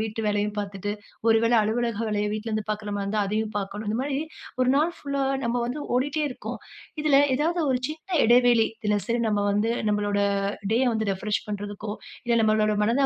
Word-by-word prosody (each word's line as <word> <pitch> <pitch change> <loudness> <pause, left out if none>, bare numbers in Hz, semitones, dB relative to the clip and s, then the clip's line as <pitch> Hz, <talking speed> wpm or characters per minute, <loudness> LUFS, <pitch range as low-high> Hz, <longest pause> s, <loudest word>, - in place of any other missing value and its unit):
வீட்டு 220 0 -3
வேலையும் 205 0 0
பார்த்துட்டு, 205 0 -3 0.4
ஒரு 225 - +6
வேளை 235 +1 +3
அலுவலக 230 0 -1
வேலைய 210 -1 0
வீட்ல 215 +1 -4
இருந்து 215 -1 -2
பாக்கற 210 0 -3
மாதிரி 200 -1 -2
இருந்தா 210 +1 0
அதையும் 215 +1 -1
பார்க்கணும். 205 +2 -5
இந்த 220 - -1
மாதிரி 275 -1 -1 0.4
ஒரு 255 - +2
நாள் 315 +4 +2
புல்லா 280 -1 -2 0.2
நாம 235 +1 0
வந்து 255 +5 -4 0.2
ஓடிட்டே 290 +4 0
இருக்கோம். 250 - -6 0.4
இதில 285 -2 +5 0.2
ஏதாவது 335 +4 +1
ஒரு 255 - +2
சின்ன 320 +1 -2
இடைவெளி, 240 -1 +5 0.2
இதில 210 -1 +2
சரி 235 0 0
நம்ம 205 -1 +1
வந்து 210 +3 +1 0.2
நம்முடைய 205 -1 +1 0.5
டேய 240 +4 +3
வந்து 220 -1 -1
ரிஃப்ரெஷ் 205 +2 -2
பண்ணுறதுக்கோ, 205 0 -5 0.3
இல்ல 235 -1 +2
நம்முடைய 215 -1 +2
மனதை 240 +6 +2
220 Hz, 185 wpm, -25 LUFS, 210-245 Hz, 0.5 s, ஒரு